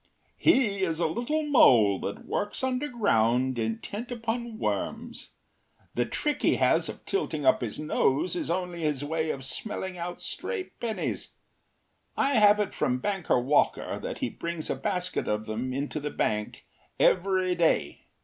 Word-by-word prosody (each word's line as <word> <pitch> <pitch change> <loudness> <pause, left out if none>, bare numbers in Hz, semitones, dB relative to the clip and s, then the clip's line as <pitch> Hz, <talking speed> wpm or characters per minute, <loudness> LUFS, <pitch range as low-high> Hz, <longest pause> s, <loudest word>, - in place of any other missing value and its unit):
“He 230 - +3
is 165 -4 0
a - - +2
little 245 - -1
mole 120 - +5
that 100 - -5
works 205 +5 -3
underground 130 - +1
intent 115 - -4
upon 235 -1 -3
worms. - - -3 0.6
The - - 0
trick 295 -1 -2
he - - +3
has - - +2
of - - -9
tilting 155 - -2
up - - +4
his 115 -4 -4
nose 150 +1 +1
is 175 - -3
only 175 -1 -2
his 150 -3 0
way 160 +1 -1
of 135 -3 -3
smelling 190 +2 -4
out 175 +1 -5
stray 450 -6 -3 0.2
pennies. 225 -2 -3 0.8
I 275 -4 +3
have 210 0 +6
it 210 - -1
from 125 -1 0
Banker 190 -1 0
Walker 140 +4 +1
that - - -5
he - - -2
brings 170 -2 -4
a - - 0
basket 180 -3 -2
of 105 +1 -1
them 115 +4 -3
into 140 +3 -3
the 150 0 -3
bank 105 -6 -2 0.3
every 185 0 +3
day. 165 - +1
175 Hz, 155 wpm, -28 LUFS, 130-220 Hz, 0.8 s, have